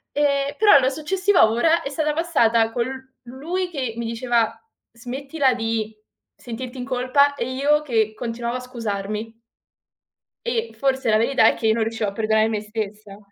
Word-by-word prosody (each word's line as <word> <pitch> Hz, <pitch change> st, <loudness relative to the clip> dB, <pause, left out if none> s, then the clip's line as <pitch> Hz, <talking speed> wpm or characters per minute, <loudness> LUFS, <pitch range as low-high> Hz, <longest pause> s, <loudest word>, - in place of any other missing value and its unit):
Ehm, 280 Hz, -1 st, +1 dB
però 410 Hz, -9 st, +7 dB
la 260 Hz, -1 st, +2 dB
successiva 360 Hz, -, +2 dB
ora 320 Hz, +9 st, +2 dB
è -, -, -4 dB
stata 300 Hz, +1 st, -1 dB
passata 235 Hz, -9 st, +2 dB
con 235 Hz, 0 st, -1 dB
l 265 Hz, 0 st, -9 dB
lui 320 Hz, +9 st, -4 dB
che 260 Hz, -9 st, -4 dB
mi 235 Hz, -, -3 dB
diceva: 230 Hz, 0 st, 0 dB, 0.4 s
"Smettila 265 Hz, +4 st, -1 dB
di 225 Hz, -2 st, -2 dB, 0.4 s
sentirti 245 Hz, +2 st, -8 dB
in 245 Hz, -, -4 dB
colpa", 265 Hz, +3 st, +2 dB
e 250 Hz, -1 st, -3 dB
io 290 Hz, +3 st, +2 dB
che 220 Hz, -6 st, 0 dB
continuavo 235 Hz, +1 st, -3 dB
a -, -, -6 dB
scusarmi. 225 Hz, -2 st, -5 dB, 1.1 s
E 470 Hz, -1 st, -2 dB
forse 265 Hz, -3 st, 0 dB
la 215 Hz, -, +4 dB
verità 250 Hz, +5 st, +3 dB
è -, -, +4 dB
che 225 Hz, -, -1 dB
io 220 Hz, -, +4 dB
non 225 Hz, 0 st, 0 dB
riuscivo 220 Hz, -1 st, -2 dB
a -, -, -10 dB
perdonare 220 Hz, +1 st, +2 dB
me 215 Hz, -2 st, -1 dB
stessa. 210 Hz, -1 st, -6 dB
245 Hz, 170 wpm, -22 LUFS, 225-280 Hz, 1.1 s, però